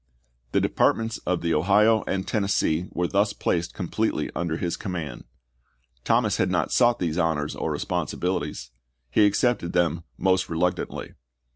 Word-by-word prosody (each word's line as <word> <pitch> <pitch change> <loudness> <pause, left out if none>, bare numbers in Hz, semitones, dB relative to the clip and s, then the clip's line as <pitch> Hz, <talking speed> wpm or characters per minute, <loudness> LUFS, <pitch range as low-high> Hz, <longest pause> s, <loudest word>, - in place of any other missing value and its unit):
The - - +4
Departments 115 0 +1
of 90 -1 +1
the 85 -1 0
Ohio 105 +7 +4
and 95 0 -1
Tennessee 95 -5 +1
were 90 - -1
thus 100 +2 +1
placed 85 -3 -1
completely - - -1
under 85 -2 -1
his 85 -1 -2
command. 90 -8 -5 0.8
Thomas - - +2
had - - +1
not - - 0
sought 120 -1 +4
these 85 -3 -1
honors 80 -3 0
or - - -2
responsibilities; 75 -8 -2 0.4
he 105 +5 +5
accepted 105 -4 +1
them 85 -2 +1
most 95 0 +1
reluctantly. 90 +2 -2
90 Hz, 140 wpm, -25 LUFS, 85-100 Hz, 0.8 s, he